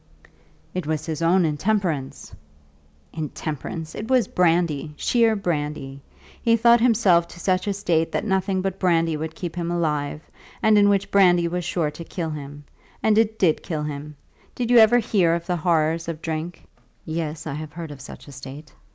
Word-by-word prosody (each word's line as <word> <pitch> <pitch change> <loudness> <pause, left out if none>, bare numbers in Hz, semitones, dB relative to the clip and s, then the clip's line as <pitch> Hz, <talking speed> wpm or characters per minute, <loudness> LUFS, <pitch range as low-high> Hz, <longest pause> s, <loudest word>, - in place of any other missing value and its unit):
"It 180 -4 -4
was 155 -1 -2
his 160 -1 -4
own 175 +2 +3
intemperance!" 160 -3 -2 0.8
"Intemperance! 155 +1 -5
It 215 - -6
was 255 -3 +3
brandy, 165 -4 +1
sheer 230 -2 +2
brandy. 150 -7 -3 0.4
He 230 -1 +4
brought 235 +1 +5
himself 205 -8 +4
to 175 - -13
such 185 +2 0
a 200 - +1
state 170 -5 0
that 200 - -2
nothing 190 -2 0
but 195 0 -3
brandy 165 -3 +2
would 160 +1 -5
keep 175 -2 -6
him 170 -1 -3
alive, 155 -3 -1 0.4
and 220 0 +5
in 205 0 +5
which 200 -1 +1
brandy 175 -3 +4
was 175 0 -3
sure 165 -3 -1
to 170 - -9
kill 165 -1 -4
him; 145 -1 -8 0.4
and 220 -1 +4
it 220 -1 +1
did 170 -7 +2
kill 155 -5 -4
him. 150 0 -6 0.4
Did 245 -1 -2
you 245 - +8
ever 225 +2 +7
hear 185 -8 +2
of 170 0 -5
the 180 0 -1
horrors 165 0 +1
of 165 -2 -4
drink?" 160 +1 -5 0.4
"Yes; 160 -1 -4
I 155 - -4
have 150 0 -7
heard 165 -2 -7
of 140 -2 -10
such 140 - -11
a - - -10
state." 140 +2 -10
170 Hz, 180 wpm, -23 LUFS, 155-195 Hz, 0.8 s, you